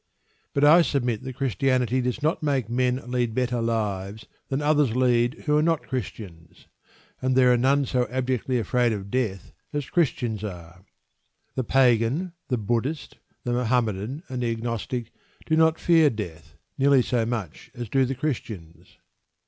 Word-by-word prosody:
But 140 - +2
I 155 +4 +8
submit 125 -8 0
that 130 -1 -7
Christianity 130 -1 +1
does 125 +3 -2
not 155 +2 +1
make 140 -7 0
men 125 0 +2 0.2
lead 120 -3 0
better 125 -2 0
lives 105 -3 -2 0.2
than 135 - -1
others 145 -5 +2
lead 120 -1 +2
who 150 -1 +2
are 150 - +4
not 165 -1 +1
Christians, 100 -9 -7 0.6
and 130 0 +1
there 125 -1 +5
are - - +3
none 135 +3 +3
so 125 -1 0
abjectly 130 0 -1
afraid 120 +2 +1
of 100 -1 -6
death 110 -8 -2 0.2
as 145 -2 -4
Christians 120 - 0
are. 90 -2 -8 0.7
The 130 - -1
Pagan, 130 +7 +2
the 125 - 0
Buddhist, 120 +8 -2 0.2
the 120 - -1
Mohammedan, 120 - -1
and 125 -1 -4
the 120 - 0
Agnostic 115 +1 -3 0.3
do 160 - +1
not 160 0 +4
fear 165 -3 +5
death 85 - -7 0.2
nearly 135 -1 +5
so 120 -1 0
much 110 -8 -4
as 120 -1 -5
do 135 +5 +2
the 130 +1 -1
Christians. 95 - -5
125 Hz, 155 wpm, -25 LUFS, 110-135 Hz, 0.7 s, I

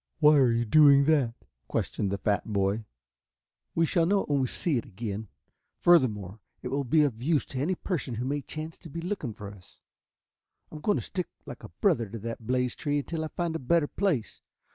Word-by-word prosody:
"Why 150 -1 +6
are 130 -4 +5
you 115 0 +1
doing 140 +2 +6
that?" 140 -7 +2 0.3
questioned 100 - -1
the 100 - -1
fat 105 +2 -1
boy. 100 +2 0 0.9
"We 165 - +3
shall 165 0 +2
know 200 +1 +3
it - - -12
when 145 -1 +2
we 130 - +1
see 145 0 0
it - - -8
again. 105 +1 -5 0.5
Furthermore, 110 - +3 0.2
it - - -3
will 140 +1 -1
be 150 +4 +3
of 120 -6 -1
use 150 +2 +1
to 130 - -5
any 170 +7 0
person 155 -10 -3
who 120 +3 -3
may 145 +2 -1
chance 155 +3 -7
to 165 - -11
be 165 - -6
looking 165 - -4
for 100 -1 -8
us. 95 -3 -18 0.9
I - - -10
am - - -10
going 205 +3 +2
to - - -3
stick 180 -2 -3 0.2
like - - -9
a - - -9
brother 115 -3 +1
to 115 - -6
that 115 +1 -6
blazed 125 -1 0
tree 145 -1 0
until 160 +3 -3
I - - -2
find 170 0 -3
a - - -2
better 160 +4 +2
place. 145 - -1
140 Hz, 215 wpm, -28 LUFS, 115-160 Hz, 0.9 s, Why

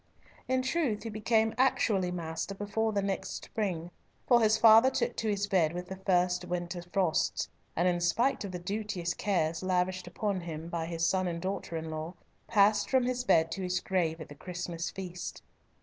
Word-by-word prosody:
In 260 0 +1
truth 265 -6 0
he 230 - -4
became 220 +1 +2
actually 210 -8 +2
master 170 +2 -4
before 205 +2 -1
the 200 -2 0
next 195 -1 -3
spring, 180 -6 -3 0.4
for 240 -2 +6
his 220 0 +4
father 225 +3 +8
took - - -1
to 220 - -1
his 205 -1 0
bed 175 -6 +2
with 180 +1 -6
the 190 - -4
first 180 -1 +1
winter 175 0 -3
frosts, 185 -5 +1 0.3
and 175 +2 +2
in 175 -1 +1
spite 240 +10 +2
of 200 - -5
the 180 - -4
duteous 185 -1 -3
cares 165 -5 0
lavished 185 0 0
upon 200 -4 -2
him 165 -1 -6
by 165 -1 -3
his 165 -1 -1
son 185 +2 +1
and 170 -1 -3
daughter 185 -2 -3
in 160 0 -5
law, 160 +3 -5 0.3
passed 210 -1 +4
from 260 -2 +3
his 250 0 -1
bed 165 -8 +3
to 190 - -4
his 180 0 0
grave 170 -4 0
at 160 - -7
the - - -8
Christmas 175 +1 -5
feast. 180 -2 -7
185 Hz, 190 wpm, -30 LUFS, 175-215 Hz, 0.4 s, father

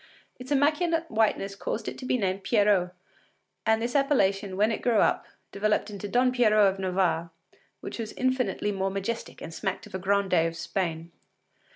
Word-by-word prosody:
Its 250 +1 -9
immaculate 315 +4 +2
whiteness 215 -3 +1
caused 215 +2 -4
it - - -4
to 255 - -8
be 255 - +2
named 195 -3 -1
Pierrot, 205 -5 +3 0.8
and 220 0 +4
this 240 +3 -3
appellation, 200 -9 +1
when 210 +3 +3
it 220 - -3
grew 240 -3 +2
up, - - +2 0.2
developed 210 +1 0
into 205 0 -6
Don 250 +4 +2
Pierrot 215 -5 +4
of 195 - -12
Navarre, 180 -3 0 0.5
which - - -7
was 220 -2 -4
infinitely 255 -4 0
more 195 -1 -1
majestic 200 +4 -4
and 165 - -7
smacked - - -3
of - - -15
a 190 - -3
grandee 190 -3 +2
of 165 - -5
Spain. 170 -1 -3
205 Hz, 175 wpm, -27 LUFS, 190-245 Hz, 0.8 s, and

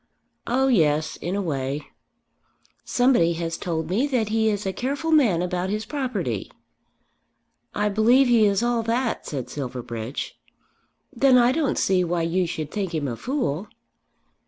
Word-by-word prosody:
"Oh 260 +3 +2
yes, 155 - +2
in 175 +3 -3
a 200 - -1
way." 140 -2 -3 1.0
"Somebody 245 -10 +3
has 165 0 -3
told 160 -2 -3
me 215 - +1
that 245 -6 0
he 220 0 +2
is 205 -1 -2
a 190 - -1
careful 285 - -2
man 225 - +4
about 180 +1 -2
his 215 +2 -2
property." 210 - -3 1.2
"I 210 +1 +1
believe 230 +6 +4
he 230 -3 +5
is 200 +2 +1
all 240 -1 +1
that," 235 +2 -1
said 135 -5 -4
Silverbridge. 125 -2 -5 0.7
"Then 265 -2 +5
I 245 0 +5
don't 290 0 0
see 185 -1 +2
why 170 -1 -1
you 175 +2 0
should 155 -3 -5
think 195 -5 -3
him 150 -3 -1
a 120 - -3
fool." 210 - -2
195 Hz, 155 wpm, -24 LUFS, 160-245 Hz, 1.2 s, he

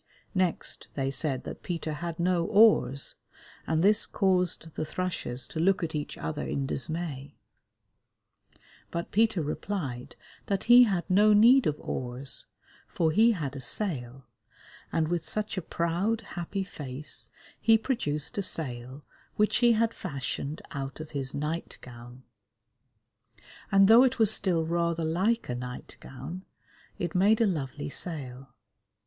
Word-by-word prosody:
Next 185 -3 0
they 135 -1 -1
said 135 -1 -1
that - - -8
Peter 165 -3 -3
had 170 +2 -5
no 175 0 +2
oars, 205 - +4 0.5
and 160 +1 +1
this 210 +2 +4
caused 180 -4 0
the - - -3
thrushes 155 -8 -4
to 160 - -5
look 190 +2 +2
at 160 - -3
each 150 -1 -4
other 150 -1 -4
in 140 - -2
dismay, 145 0 -4 1.5
but 170 0 -4
Peter 220 -5 +2
replied 145 -5 -4 0.3
that 195 -2 -1
he 245 +1 +8
had 190 -6 -1
no 205 +3 +5
need 240 +5 +6
of 150 -1 -1
oars, 125 +2 -2 0.4
for 160 -2 0
he 225 +7 +5
had 145 -8 -4
a 135 - -5
sail, 130 - -3 0.7
and 160 -1 +1
with 170 0 -1
such 215 +2 -1
a 185 - -2
proud, 175 +8 -1
happy 190 +3 -3
face 145 -5 -4 0.3
he 225 -1 +5
produced 150 - -2
a - - +2
sail 130 -5 -4 0.3
which 210 0 +2
he 240 -1 +5
had 230 +1 +1
fashioned 140 -1 -5
out 135 0 -5
of 155 0 -8
his 135 -2 -4
night 150 +4 -3
gown, 120 +1 -12 1.5
and 195 -1 +6
though 225 +3 +8
it 260 - +2
was 220 -1 +4
still 170 -6 0
rather 170 0 0
like 195 +9 +1
a 125 - -2
night 125 0 -7
gown 140 +8 -8 0.5
it 175 -2 -3
made 200 +4 +4
a 230 - +4
lovely 145 -6 -3
sail. 135 -7 -5
165 Hz, 145 wpm, -28 LUFS, 140-195 Hz, 1.5 s, he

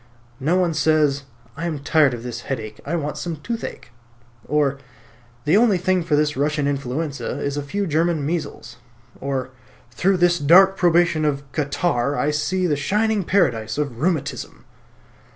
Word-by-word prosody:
No 155 +7 +1
one 180 -3 +2
says 150 -2 +2 0.3
"I 160 +4 -4
am 160 -3 -2
tired 145 -2 +3
of 115 - -9
this 120 -1 -5
headache; 110 -6 -5
I 170 - -1
want 150 -3 -3
some 170 -2 -3
toothache," 225 - -6 0.6
or 140 -2 +1 0.7
"The 155 +5 +3
only 215 -3 +4
thing 185 +1 +1
for 165 -3 0
this 150 0 +1
Russian 145 +1 0
influenza 140 +2 -3
is 140 -1 -2
a 145 - -2
few 200 +9 -3
German 160 -2 0
measles," 155 -4 -4 0.4
or 135 -1 -3 0.4
"Through 190 +10 +1
this 175 0 +3
dark 190 +6 +6
probation 175 -3 +3
of 140 -2 0
catarrh 145 -2 0
I 150 - +1
see 185 +5 0
the 155 -4 +2
shining 210 +8 0
paradise 115 - +1
of 140 -6 -3
rheumatism." 155 -3 -2
150 Hz, 155 wpm, -22 LUFS, 140-175 Hz, 0.7 s, dark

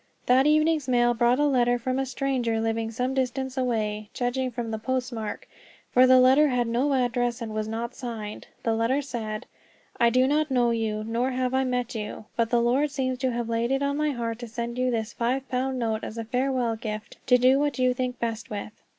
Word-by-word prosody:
That 260 +3 +4
evening's 310 -1 +3
mail 240 -1 +3
brought 240 +1 +3
a 295 - +3
letter 245 -3 +3
from 255 +2 -2
a 270 - -1
stranger 250 -4 -1
living 225 0 -1
some 250 +3 -2
distance 265 0 -2
away, 215 -5 -1
judging 255 +1 -1
from 235 -2 -4
the 220 - -3
postmark; 235 -2 -3 0.4
for 255 +1 +6
the 255 0 +7
letter 265 +4 +6
had 250 -3 +1
no 245 +5 +1
address, 245 -1 0
and 225 -2 -5
was 215 0 -2
not 230 +2 -4
signed. 225 -5 -6 0.2
The 225 - +1
letter 235 +6 +1
said: 220 -5 -5 0.5
"I 235 -1 +5
do 255 +2 +3
not 300 +2 +1
know 245 -3 +2
you, 220 -2 -1
nor 230 +3 -1
have 255 0 -1
I 265 0 +2
met 250 -1 -1
you, 215 -1 -5
but 230 -1 +1
the 235 0 +2
Lord 265 +5 +2
seems 260 -3 -2
to 260 -1 0
have 235 -1 -2
laid 230 +1 0
it 270 +1 +1
on 280 0 0
my 300 +1 +1
heart 230 -4 -3
to 240 - -6
send 235 +2 -4
you 255 0 +2
this 225 -2 -2
five 260 +3 -1
pound 260 +1 -1
note 225 -2 -1
as 225 - -6
a 230 - -4
farewell 250 0 0
gift, 215 -1 -6
to 250 - +6
do 255 +2 +4
what 290 -1 0
you 255 -1 +3
think 250 0 -3
best 230 -1 -3
with." 210 0 -5
245 Hz, 220 wpm, -26 LUFS, 230-260 Hz, 0.5 s, the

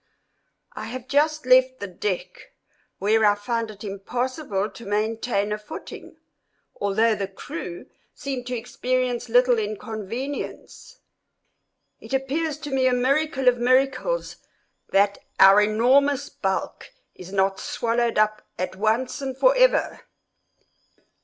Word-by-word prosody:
I - - -6
have 255 0 -7
just 305 +1 +1
left 255 0 +4
the 200 - -4
deck, 185 -1 -5 0.4
where 220 +2 +2
I 205 -1 +5
find 230 +2 -2
it 210 0 -11
impossible 210 +2 -3
to 235 - -12
maintain 215 0 -1
a 210 - -2
footing, 210 - -10 0.6
although 220 +3 +2
the 200 -2 -3
crew 175 -2 -7 0.3
seem 265 -2 -4
to 250 0 -3
experience 245 +1 -2
little 245 0 +4
inconvenience. 220 - -6 1.0
It 270 - -4
appears 285 +3 -1
to 295 -2 -6
me 260 -1 +2
a 255 - +3
miracle 270 +2 +1
of 245 -1 +5
miracles 270 - +1 0.5
that 200 +1 +2 0.2
our 195 +2 +8
enormous 255 +7 +3
bulk 190 -1 -3 0.2
is 185 0 -11
not 195 0 +1
swallowed 235 0 -1
up 215 0 +2 0.2
at 185 +1 -3
once 220 +7 0
and 265 -1 -4
forever. - - +3
235 Hz, 120 wpm, -24 LUFS, 205-260 Hz, 1.0 s, our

